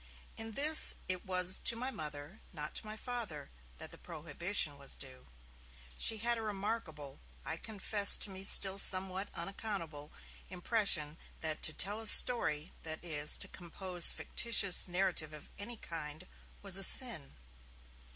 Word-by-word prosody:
In 225 0 -5
this 305 +5 +4
it 185 +1 -3
was 185 0 0
to 235 - +6
my 255 +3 -5
Mother, 150 - -9
not 150 -3 -7
to - - -2
my 215 +1 -7
Father, 220 - -6 0.3
that - - -6
the - - -13
prohibition 165 -1 -2
was 140 - -2
due. 130 -2 -9 0.7
She 220 - +2
had 235 +2 -1
a - - -6
remarkable, 195 -9 -5 0.3
I 160 - -3
confess 205 0 +1
to 205 - +1
me 190 0 -6
still 195 0 +4
somewhat 190 +1 +6
unaccountable 170 -8 -7 0.4
impression 175 -5 -1 0.2
that 155 -1 -4
to 160 - +2
'tell 205 +6 -1
a 225 - +1
story', 175 -10 +3
that 160 0 -6
is, 150 -3 +1
to - - -3
compose 180 0 0
fictitious 205 -6 +1
narrative 175 -4 -2
of 150 - -12
any 230 +3 -6
kind, 160 -1 -8 0.4
was 195 -2 +2
a 195 - +3
sin. 190 - +3
185 Hz, 150 wpm, -33 LUFS, 155-215 Hz, 0.7 s, to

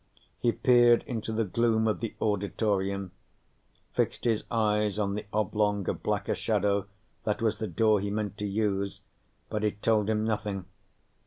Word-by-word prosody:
He 120 - +3
peered 120 -2 +5
into 115 -3 -4
the 110 +1 +1
gloom 110 +2 +2
of 105 - 0
the 115 - -4
auditorium, 100 -2 0 0.8
fixed - - 0
his 115 -3 +1
eyes 105 -2 +1
on 100 -2 0
the 105 0 -5
oblong 105 -2 0
of - - -2
blacker - - 0
shadow 100 -2 0 0.4
that 105 - -1
was 110 -2 +1
the 110 - -3
door 110 -2 +3
he 100 +1 -2
meant 105 -1 -2
to 105 - -1
use, 100 -1 -1 0.5
but 105 -1 -3
it 105 -1 -2
told 110 -2 +3
him 110 -1 +1
nothing. 105 -3 -2
105 Hz, 160 wpm, -28 LUFS, 100-110 Hz, 0.8 s, peered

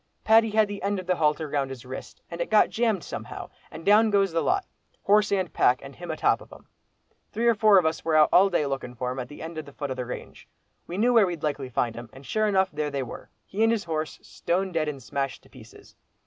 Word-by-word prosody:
Paddy 225 0 +5
had 215 0 +3
the 205 0 -6
end 200 +1 -1
of 185 - -5
the 180 0 0
halter 155 0 +1
round 140 -2 -1
his 130 -2 -9
wrist, 130 +1 -9
and 170 0 -5
it - - -2
got 215 - +4
jammed 220 -7 0
somehow, - - -7 0.2
and 160 - -10
down 215 +2 +5
goes 200 -2 +2
the 165 0 0
lot, 380 +1 +1 0.4
horse 210 +1 +3
and 190 -3 0
pack, 125 +1 +3
and 135 0 -10
him 175 0 -9
atop 160 - +1
of - - -15
'em. - - -14 0.7
Three 230 +3 -2
or 235 - +6
four 215 -2 +5
of 180 - +4
us 160 0 -1
were 160 -1 +1
out 155 -1 +6
all 195 +2 +6
day 170 -5 +1
looking 135 -3 -4
for 125 +1 -3
him 130 - -5
at 125 -1 -5
the 155 -1 -8
foot 145 -2 -4
of 130 - -4
the 125 - -3
range. - - -8 0.4
We 175 - -5
knew 240 +4 +3
where 220 -5 +5
we'd 170 -3 -5
likely 145 -3 -2
find 120 -1 -1
him, 120 0 -9
and 135 +1 -13
sure 215 +6 0
enough 190 -2 +2
there 150 0 -2
they 140 -2 -2
were, 120 - -9 0.2
he 205 - -4
and 225 0 +5
his 230 -3 0
horse, 160 -2 -3
stone 185 +2 -2
dead 160 -3 0
and 140 -4 -5
smashed 135 +4 -3
to - - -21
pieces. 115 -3 -16
165 Hz, 255 wpm, -26 LUFS, 140-205 Hz, 0.7 s, or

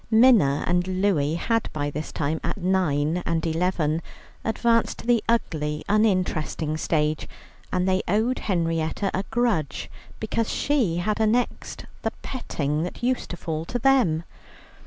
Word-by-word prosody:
Minna 220 - +5
and 175 0 +1 0.2
Louie 160 -6 +2
had 225 +6 0
by 145 -1 -2
this 150 +2 -5
time, 155 +1 -2
at - - -2
nine 175 -5 +1
and 165 0 -1
eleven, 165 -1 0 0.4
advanced 230 +1 +1
to - - -10
the 235 -2 +3
ugly, 150 -9 0
uninteresting 185 -7 +1
stage, 155 -1 0 0.4
and 180 0 +1
they 185 0 +2
owed 220 +7 +1
Henrietta 165 0 -1
a 190 - 0
grudge 225 - 0 0.3
because 220 0 -1
she 255 - +1
had 210 +5 0
annexed 225 +3 0 0.2
the - - 0
petting 150 - -2
that 180 +7 -5
used 255 +1 0
to 175 - -5
fall 160 -2 -3
to 245 - -2
them. 240 -11 +3
180 Hz, 140 wpm, -25 LUFS, 155-225 Hz, 0.4 s, Minna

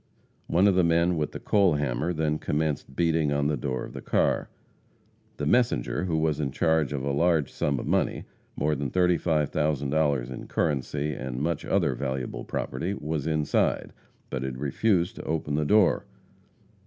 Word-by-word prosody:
One 95 +4 +4
of 100 - +4
the 90 0 +3
men 85 +1 +3
with 75 -2 -1
the - - -7
coal 100 -6 +3
hammer 70 +2 -1
then 75 -2 0
commenced 75 -3 -2
beating 80 -2 +2
in 70 0 0
the 75 +1 +1
door 65 -3 -3
of - - -11
the - - -7
car. - - +1 0.9
The 75 - -2
messenger, 115 - +1
who 85 -3 0
was 80 -2 +1
in 70 -3 0
charge 80 +1 +1
of 70 -3 -3
a 70 - 0
large 80 -1 +2
sum 70 -1 0
of - - -5
money - - 0 0.3
more 75 +2 +1
than 70 -2 -2
$35,000 75 -5 +1
in 65 - -7
currency, 75 0 -1
and 65 -2 -5
much 80 +2 -1
other - - +1
valuable 65 -2 -3
property 85 +10 -3
was 75 -2 -3
inside, 75 -2 0 0.4
but 65 - -2
had 65 -1 -4
refused 85 - +1
to - - -6
open 75 -2 -2
the 75 +1 +1
door. 105 +2 +3
75 Hz, 170 wpm, -27 LUFS, 70-85 Hz, 0.9 s, One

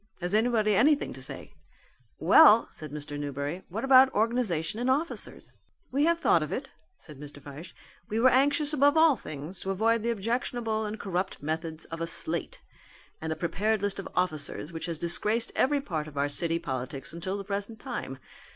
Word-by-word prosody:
Has 180 +1 -2
anybody 215 -1 +2
anything 280 +9 +3
to - - -11
say?" - - -7 0.6
"Well," 230 -8 +7
said 155 -2 -7
Mr. 145 0 -6
Newberry, 145 +4 -4
"what 210 +6 -4
about 265 0 +7
organization 215 -5 0
and 245 +2 0
officers?" 295 +6 -2 0.4
"We 280 +3 +2
have 335 0 +3
thought - - +3
of - - -4
it," - - -4 0.3
said 150 -4 -14
Mr. 145 0 -10
Fyshe. 145 +5 -11 0.3
"We 220 - -1
were 255 +2 +5
anxious 290 +3 +2
above 290 +1 +4
all 320 -3 +6
things 155 - -8
to 190 - -5
avoid 225 +4 +2
the 235 - -1
objectionable 230 0 -2
and 210 +1 -5
corrupt 185 -4 -3
methods 160 +1 -4
of 165 0 -7
a 165 - -1
'slate' 165 0 -2 0.6
and 160 0 -3
a - - -1
prepared 200 +6 -1
list 205 -1 -1
of 195 - -6
officers 155 -2 -2
which 165 - -5
has 165 -2 -3
disgraced 210 +8 +1
every 285 +1 +2
part 155 - -4
of 150 -2 -11
our 140 +1 +1
city 165 +3 -1
politics 135 -2 -5
until 185 +4 -4
the 200 - -5
present 205 +3 -4
time. 235 - -5
195 Hz, 185 wpm, -28 LUFS, 160-235 Hz, 0.6 s, Well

